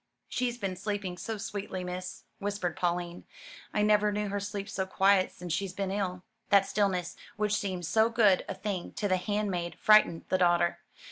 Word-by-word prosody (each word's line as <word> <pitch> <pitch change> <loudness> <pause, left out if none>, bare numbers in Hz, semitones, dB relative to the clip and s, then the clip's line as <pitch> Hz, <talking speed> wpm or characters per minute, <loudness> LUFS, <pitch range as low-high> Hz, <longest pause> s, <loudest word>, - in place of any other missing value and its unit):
"She's 245 -1 -1
been 195 -5 -3
sleeping 200 -1 -3
so 220 +4 -5
sweetly, 200 -3 -5
miss," 180 0 -6 0.2
whispered 200 -4 -2
Pauline. 175 0 -2 0.5
"I 210 - +1
never 210 0 +4
knew 210 0 -2
her 200 +1 -1
sleep 200 0 -4
so 190 -2 -3
quiet 190 0 +3
since 175 -2 -5
she's 190 +1 -2
been 195 0 -2
ill." 185 -2 -2 0.3
That 200 -2 +6
stillness 190 -5 0 0.2
which 210 -1 0
seemed 190 -4 -2
so 220 +6 +3
good 210 -5 +4
a - - -3
thing 200 -4 -4
to 205 - -1
the 185 -1 +2
handmaid 190 -3 -2
frightened 215 -6 +5
the 185 - +2
daughter. 175 -1 +3
195 Hz, 180 wpm, -30 LUFS, 180-210 Hz, 0.5 s, That